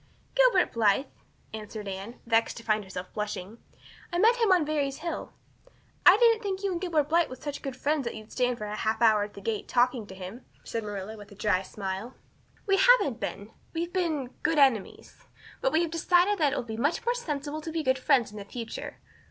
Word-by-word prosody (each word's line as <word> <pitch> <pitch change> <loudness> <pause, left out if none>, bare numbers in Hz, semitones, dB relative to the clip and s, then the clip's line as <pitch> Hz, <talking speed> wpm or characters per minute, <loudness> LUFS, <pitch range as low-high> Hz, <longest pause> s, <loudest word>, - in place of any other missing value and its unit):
"Gilbert - - +4
Blythe," 225 +3 +3 0.5
answered 215 -1 -7
Anne, 195 +5 -6
vexed 230 -1 +2
to 230 - -9
find 215 -1 +1
herself 185 -1 -8
blushing. 210 +1 -5 0.5
"I 345 - -1
met 455 +6 +5
him 455 -4 +3
on 355 -4 +4
Barry's 285 -3 -1
hill." 335 +1 -5 0.8
"I - - +10
didn't 460 -2 +5
think 390 -2 -3
you 395 - 0
and 350 -1 -3
Gilbert 335 -5 +2
Blythe 335 +2 +2
were 255 - -6
such 290 +2 -6
good 270 -2 -5
friends 285 +1 0
that 235 - -3
you'd 215 0 -11
stand 250 -1 0
for 215 - -5
half 215 +1 -1
an 235 - +5
hour 215 -1 +4
at 205 - -13
the 200 - -9
gate 215 +1 -3
talking 245 -3 +1
to 190 - -10
him," 190 +6 -8 0.2
said 230 - -3
Marilla 205 0 -6
with 205 -1 -12
a - - -12
dry 195 -2 +1
smile. 195 +4 -5 0.5
"We 390 -1 +3
haven't 385 - +5
been 205 0 -5 0.2
we've 340 +2 -2
been 315 -9 -1
good 325 - +1
enemies. 265 -8 +1 0.4
But - - +2
we 330 - +3
have 335 - -3
decided 355 +4 +3
that 295 -3 +3
it - - -1
will - - -2
be 220 -2 -6
much 290 - 0
more 480 - +2
sensible 305 - -4
to 320 - -6
be 320 -1 -2
good 260 -1 +2
friends 255 -5 +3
in 210 - -8
the 200 - -8
future. 230 +2 -6
255 Hz, 220 wpm, -28 LUFS, 215-335 Hz, 0.8 s, I